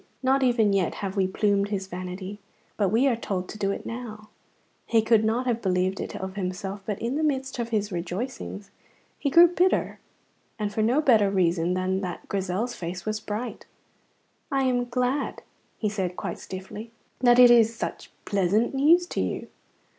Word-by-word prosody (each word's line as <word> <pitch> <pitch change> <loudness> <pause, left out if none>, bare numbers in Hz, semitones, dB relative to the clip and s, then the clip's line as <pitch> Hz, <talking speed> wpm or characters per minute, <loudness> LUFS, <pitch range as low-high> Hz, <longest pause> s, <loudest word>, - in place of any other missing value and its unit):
not 265 +1 +3
even 235 -5 +3
yet 190 -4 +1
have 195 -1 -4
we 190 -2 +2
plumed 200 +1 +1
his 195 -2 -2
vanity. 185 +2 -6 0.4
But 200 -3 +1
we 230 +7 +3
are 265 -4 +3
to 195 -5 -3 0.2
do 195 - 0
it 200 - -4
now. 215 -3 -7 0.6
He 225 -1 +3
could 220 -1 +4
not 230 +4 0
have 240 -2 0
believed 185 0 0
it - - -5
of 190 0 -5
himself, 195 +1 -4
but 210 -2 -2
in 235 +6 -2
the 315 - 0
midst 265 -4 -1
of 235 -1 -2
his 210 -2 -1
rejoicings 195 +3 -5 0.5
he 285 - 0
grew 340 +5 +8
bitter, 360 +2 +1 0.6
and 210 -2 -3
for 220 - 0
no 245 +7 +3
better 220 -8 +4
reason 175 -2 +1
than 185 +1 0
that 180 -3 -6
Grizel's 195 +5 -2
face 175 -1 -6
was 215 0 -1
bright. 215 +3 -5 0.8
"I 270 -1 +2
am 250 -2 +1
glad," 250 +3 -1 0.3
he 215 - -1
said 190 -4 -2
quite - - -4
stiffly, 190 +4 -8 0.3
"that 245 -1 +5
it 250 -1 +9
is 230 -1 +5
such - - -5 0.2
pleasant 200 +6 +1
news 320 +6 +5
to - - -3
you." - - -3
215 Hz, 175 wpm, -26 LUFS, 190-245 Hz, 0.8 s, it